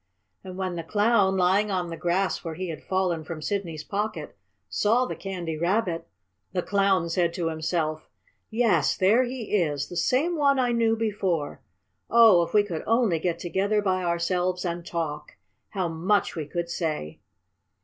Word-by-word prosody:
And 185 -1 -8
when 185 -2 -3
the 165 - -4
Clown, 205 +1 +2
lying 190 +4 +3
on 180 -3 -2
the - - -4
grass 180 +3 0
where 165 -2 -5
he 185 +1 -4
had 160 - -6
fallen 185 -4 0
from 160 0 -6
Sidney's 165 -3 -3
pocket, 200 -4 -4 0.3
saw 215 - +2
the - - -5
Candy 180 -5 -5
Rabbit, 170 -1 0 0.5
the 180 -2 -1
Clown 195 -4 +2
said 170 0 0
to 170 -2 -1
himself: 160 -1 -2 0.4
"Yes, 220 -10 +2
there 205 +6 +4
he 245 -4 -3
is! 145 -6 -1
The 175 - -8
same 295 - +1
one 280 -3 +3
I 250 -2 +2
knew 230 -1 +2
before. 195 -9 -2 0.5
Oh, 225 -7 +7
if 170 - -2
we 210 -1 +4
could 170 -6 -5
only 225 -7 +2
get 170 0 -1
together 195 +5 0
by 185 -2 0
ourselves 180 +1 0
and 170 0 -3
talk! 165 -3 -4 0.3
How 190 -4 -2
much 175 +6 0
we 155 -3 -4
could 170 +2 -3
say!" 155 - -3
180 Hz, 170 wpm, -26 LUFS, 165-205 Hz, 0.5 s, Oh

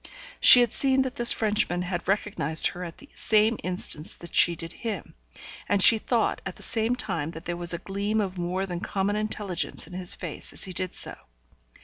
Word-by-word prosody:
She 245 - +9
had 240 -3 +1
seen 265 -1 +2
that 260 -1 -5
this 240 -4 +4
Frenchman 205 -5 0
had 180 -1 -5
recognised 195 -6 0
her 180 - -8
at 170 -1 -9
the 285 - -15
same 215 +1 +1
instant 180 -4 -1
that 170 - -10
she 175 - +4
did 165 +1 -8
him, 215 -6 -6 0.6
and 205 - +2
she 220 +3 +9
thought 235 0 -1
at 190 - -7
the - - -7
same 230 +2 0
time 170 -11 -4
that 165 0 -10
there 175 - -3
was 175 -1 -5
a 170 - -1
gleam 200 +4 -3
of 195 -3 -3
more 180 +2 -3
than 175 -2 -5
common 200 +2 -2
intelligence 210 -3 -2
on 180 - -14
his 180 0 0
face 170 -4 -8
as - - -5
he 185 - -2
did 185 0 -4
so. - - +2
190 Hz, 210 wpm, -25 LUFS, 175-215 Hz, 0.6 s, She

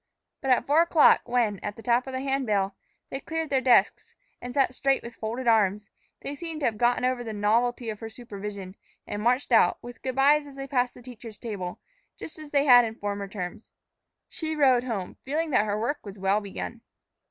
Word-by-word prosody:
But 270 - -3
at 255 - +3
four 300 +4 +4
o'clock, 335 -2 +5
when, 230 -5 +1
at 205 - -5
the 225 - -12
tap 245 +1 +2
of 265 - -6
the 260 - -2
hand 270 -1 -1
bell, 200 -2 0 0.4
they 270 - -3
cleared 320 +1 -4
their 265 -1 +2
desks 250 -2 +3 0.3
and 245 - -6
sat 265 -1 +2
straight 270 +1 +1
with 235 - -8
folded 235 +4 -5
arms, 210 -2 +2 0.3
they 280 - -5
seemed 320 +1 -6
to - - 0
have 220 -2 0
gotten 245 +1 +2
over 255 -1 0
the 225 -2 -5
novelty 230 +4 +1
of 210 - -9
her 225 - -6
supervision, 200 -4 -8 0.3
and 205 - -5
marched 250 +4 +1
out, 220 -6 +5
with 240 -1 -10
good 260 -1 -3
bys 290 +2 +4
as 280 - -12
they 270 0 -6
passed 250 -2 0
the 245 - -14
teacher's 230 -3 -10
table, 195 -6 -6 0.4
just 315 - -9
as 305 -1 -10
they 285 0 +2
had 245 -3 +8
in 225 -1 -4
former 200 -2 -4
terms. 195 +2 -7 0.6
She 315 -1 -4
rode 260 -4 +4
home, 205 -7 -4
feeling 310 +4 -2
that 215 -5 +3
her 205 +1 -1
work 285 +7 -2
was 200 -1 -9
well 195 +2 +1
begun. 215 +3 -7
240 Hz, 215 wpm, -26 LUFS, 210-270 Hz, 0.6 s, had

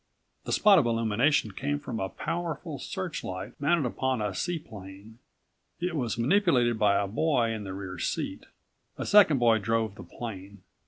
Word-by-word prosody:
The - - -4
spot 205 -3 +6
of 130 - +1
illumination 115 +2 +2
came 145 +8 -2
from 125 -6 -5
a 95 - -2
powerful 165 - -4
searchlight 165 - -5
mounted 150 0 +2
upon 130 +1 -1
a 105 -2 -2
seaplane. 110 - -6 0.6
It 175 -1 -2
was 120 -8 -2
manipulated 125 - +2
by 100 -2 +4
a 100 - 0
boy 120 +1 +1
in 110 -2 -5
the 95 - -5
rear 95 -2 -7
seat. - - -3 0.5
A - - -4
second 195 -8 +6
boy 115 -3 +4
drove 110 0 0
the 100 - -11
plane. 100 0 -8
115 Hz, 160 wpm, -28 LUFS, 100-150 Hz, 0.6 s, spot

